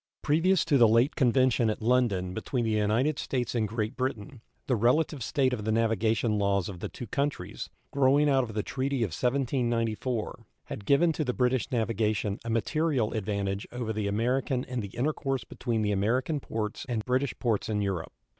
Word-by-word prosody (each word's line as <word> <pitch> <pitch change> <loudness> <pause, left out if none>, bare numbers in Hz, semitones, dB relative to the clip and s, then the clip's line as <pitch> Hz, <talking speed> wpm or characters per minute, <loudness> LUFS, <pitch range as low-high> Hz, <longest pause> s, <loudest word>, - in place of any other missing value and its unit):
Previous 165 +5 +3
to 145 -5 +3
the 115 - +7
late 115 +6 +3
convention 125 -3 +3
at 110 - -2
London 110 -6 +1
between 120 +4 -2
the 110 - 0
United 110 +8 +1
States 125 -3 -2
and 115 -3 0
Great 110 +3 -3
Britain 130 -1 -4 0.2
the 125 - +1
relative 130 +6 +2
state 130 +2 +1
of 110 -4 -3
the 110 - 0
navigation 110 -1 +1
laws 100 -2 +1
of 95 -4 -7
the - - -4
two 120 - -8
countries, 140 +6 -3 0.2
growing 140 +2 +4
out 135 -2 +3
of 110 -3 -7
the 105 - 0
treaty 135 -1 -1
of 105 - -1
1794, 120 - -1 0.2
had 100 - -8
given 165 +5 +4
to 155 - -1
the 125 -3 -1
British 125 0 +1
navigation 110 -3 0
a 115 - -5
material 130 +1 0
advantage 100 -2 -2
over 120 -2 -3
the 105 -1 -2
American 125 +5 0
in 125 -1 -4
the 105 0 -7
intercourse 135 0 -1
between 115 -2 -2
the 105 - +1
American 125 +9 0
ports 110 -4 -4
and 110 -3 -2
British 130 +2 0
ports 115 -4 -1
in 105 -1 0
Europe. 95 -5 -2
120 Hz, 185 wpm, -28 LUFS, 110-130 Hz, 0.2 s, the